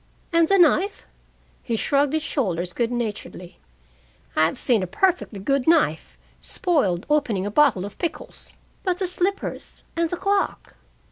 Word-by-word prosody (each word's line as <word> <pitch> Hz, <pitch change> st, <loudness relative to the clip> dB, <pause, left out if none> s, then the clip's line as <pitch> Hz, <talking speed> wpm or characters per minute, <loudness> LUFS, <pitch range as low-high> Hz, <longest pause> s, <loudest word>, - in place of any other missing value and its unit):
"And 335 Hz, -1 st, +4 dB
the 395 Hz, -, +4 dB
knife?" 370 Hz, +3 st, +3 dB, 0.6 s
He 235 Hz, -, -2 dB
shrugged 280 Hz, +5 st, +1 dB
his 315 Hz, -1 st, 0 dB
shoulders 180 Hz, -, -2 dB
good 235 Hz, -1 st, -1 dB
naturedly. 215 Hz, -6 st, -5 dB, 0.8 s
"I've 160 Hz, +1 st, +2 dB
seen 235 Hz, -6 st, +3 dB
a 185 Hz, -, -2 dB
perfectly 340 Hz, -, 0 dB
good 270 Hz, +6 st, 0 dB
knife 325 Hz, -2 st, +2 dB, 0.2 s
spoiled 235 Hz, -, 0 dB
opening 255 Hz, -11 st, +1 dB
a 205 Hz, -, -3 dB
bottle 245 Hz, -7 st, +3 dB
of 205 Hz, -, -10 dB
pickles." 320 Hz, -3 st, -6 dB, 0.3 s
"But 365 Hz, -3 st, -1 dB
the 380 Hz, -, -1 dB
slippers? 370 Hz, +2 st, -3 dB
And 335 Hz, -1 st, 0 dB
the 355 Hz, -, -3 dB
clock?" 395 Hz, +2 st, -1 dB
285 Hz, 145 wpm, -23 LUFS, 205-345 Hz, 0.8 s, And